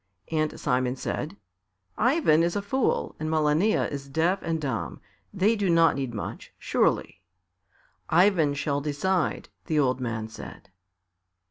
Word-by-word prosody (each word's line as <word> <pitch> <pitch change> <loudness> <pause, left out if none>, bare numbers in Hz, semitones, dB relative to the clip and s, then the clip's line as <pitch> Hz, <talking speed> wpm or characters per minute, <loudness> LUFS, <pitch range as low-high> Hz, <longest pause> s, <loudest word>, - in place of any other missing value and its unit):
And 155 -1 -1
Simon 125 0 0
said, 150 +7 -4 0.6
"Ivan 245 - +3
is 170 +1 +1
a 205 - -1
fool 260 +6 0
and 155 - -2
Malania 155 +6 +2
is 140 -1 -6
deaf 170 +7 +1
and 165 -1 -2
dumb; 130 -8 -3 0.3
they 200 +4 +2
do 205 -3 0
not 165 -1 +5
need 135 -3 -3
much, 105 -3 -6
surely." - - 0 0.9
"Ivan 165 -4 +4
shall 145 0 -1
decide," 155 +5 -1 0.2
the 155 - 0
old 130 -3 +2
man 115 -3 -3
said. 110 - -11
155 Hz, 135 wpm, -26 LUFS, 140-185 Hz, 0.9 s, not